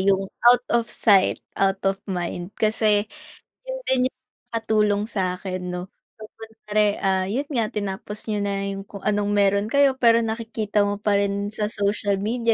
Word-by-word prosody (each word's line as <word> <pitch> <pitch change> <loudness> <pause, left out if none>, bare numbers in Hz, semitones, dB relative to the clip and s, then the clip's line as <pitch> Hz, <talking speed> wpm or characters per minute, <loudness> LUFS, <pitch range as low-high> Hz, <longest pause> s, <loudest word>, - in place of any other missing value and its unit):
yung 195 0 +2 0.2
out 245 0 +5
of 235 -1 +2
sight, 200 -6 +3 0.2
out 195 0 +1
of 195 0 +1
mind 175 -1 -3
Kasi 215 -1 +2 0.6
yun - - -4
din 255 -1 +3
yung 255 0 -3 0.4
nakatulong 210 -2 +1
sa'kin 185 -2 -3
'no? 180 +2 -5 0.5
Siyempre, 215 -2 -1
ah, 190 -1 +1
yun 255 +9 -2
nga 230 -7 -1
tinapos 205 +1 -5
niyo 210 -1 0
na 200 0 -2
yung 195 0 -6
kung 200 -1 -10
anong 205 0 0
meron 200 0 +3
kayo 280 0 +3
pero 235 -2 +5
nakikita 220 -2 -1
mo 205 0 -3
pa 205 -1 +2
rin 200 0 -1
sa 215 0 -2
social 200 -1 0
media 230 +2 +1
205 Hz, 165 wpm, -23 LUFS, 195-225 Hz, 0.6 s, out